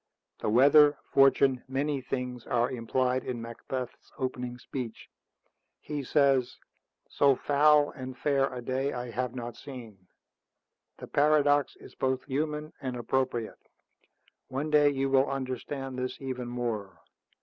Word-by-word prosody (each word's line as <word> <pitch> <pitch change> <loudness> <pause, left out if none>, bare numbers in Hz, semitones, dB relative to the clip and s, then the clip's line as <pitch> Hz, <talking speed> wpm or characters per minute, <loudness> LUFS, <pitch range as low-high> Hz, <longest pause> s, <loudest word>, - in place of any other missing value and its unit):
The - - -1
weather, 145 +5 +6 0.2
fortune, 135 -1 +4
many 140 +1 -1
things 125 -2 -4
are 120 0 +1
implied 130 +1 0
in 125 -2 -4
Macbeth's 120 +2 -6
opening 125 -2 -3
speech. 125 -2 -7 0.7
He 150 -1 -4
says, 135 -2 +2 0.5
'So 140 -1 +3
foul 145 +2 +4
and 130 -1 -8
fair 135 0 +1
a 125 -1 -6
day 130 +3 -1
I 125 -1 -5
have 125 +2 -3
not 120 -2 -5
seen.' 115 -8 -11 0.9
The - - -8
paradox 145 -1 +3
is - - -14
both 130 0 -1
human 150 +2 -3
and 130 -2 -3
appropriate. 120 -2 -1 0.9
One 140 +4 -3
day 150 -1 +6
you 135 -1 0
will 135 +1 +3
understand 135 0 -4
this 125 0 -4
even 130 -2 -4
more. 115 -6 -4
130 Hz, 130 wpm, -29 LUFS, 125-140 Hz, 0.9 s, weather